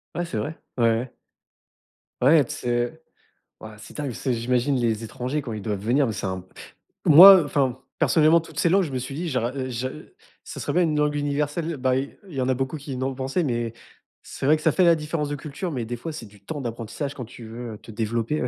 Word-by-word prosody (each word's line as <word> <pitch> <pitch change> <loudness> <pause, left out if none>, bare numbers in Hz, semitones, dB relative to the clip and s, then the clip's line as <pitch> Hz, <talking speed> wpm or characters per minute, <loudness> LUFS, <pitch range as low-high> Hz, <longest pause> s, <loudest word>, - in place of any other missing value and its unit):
Ouais, 175 - -1
c'est 150 -10 -5
vrai, 150 +10 -4 0.2
ouais, 120 - +1
ouais. 115 +2 -1 1.1
Ouais 145 +4 +6
t - - -18
c'est 120 +6 -2 0.6
ouais 110 -1 -9
c'est 105 - -13
dingue 150 -1 -3
parce 120 - -7
que 130 - +2
j'imagine 125 +3 +1
les 115 -3 0
étrangers 125 +6 -3
quand 125 -5 -6
ils 105 - -5
doivent 105 -1 -3
venir 125 +8 +2
mais 115 - -1
c'est 100 - -5
un 95 -1 -3 0.6
moi, 180 +6 +11
heu, 170 - +1
enfin 135 -3 0 0.2
personnellement, 160 +1 +4
toutes 160 -2 -8
ces 170 - +3
langues, 195 +3 +4
je 155 - -4
me 130 - -2
suis 130 +2 -6
dit: 170 +4 -3
«J'are 125 -2 -1
heu, 130 -1 -3
j'a 125 +1 -2
heu, 155 - -13 0.3
ça - - -8
serait - - -3
bien 180 - +3
une 155 -3 +1
langue 150 0 +1
universelle», 145 +3 -1
heu, - - -6
bah 130 0 +1
i 135 +2 -3
il 170 - -11
y 130 - -1
en 125 - 0
a - - +4
beaucoup 135 +4 -2
qui 140 -2 -7
n'ont 130 +1 -2
pensé, 135 +6 -1
mais 120 -5 -1
heu, - - -14 0.5
c'est - - -7
vrai 150 +3 +6
que - - -11
ça 160 - +4
fait 185 - +2
la 170 -1 +7
différence 150 -1 -3
de 145 - -2
culture, 150 +5 -5
mais 130 -5 -3
des 120 - -4
fois, 160 +8 -6
c'est 150 -7 -7
du 100 -1 -20
temps 145 +4 -5
d'apprentissage 120 +4 -5
quand 125 - -6
tu 120 +1 -12
veux, 115 +1 -7
heu, - - -11
te - - -17
développer 115 +6 -1
ouais - - 0
130 Hz, 260 wpm, -24 LUFS, 120-150 Hz, 1.1 s, moi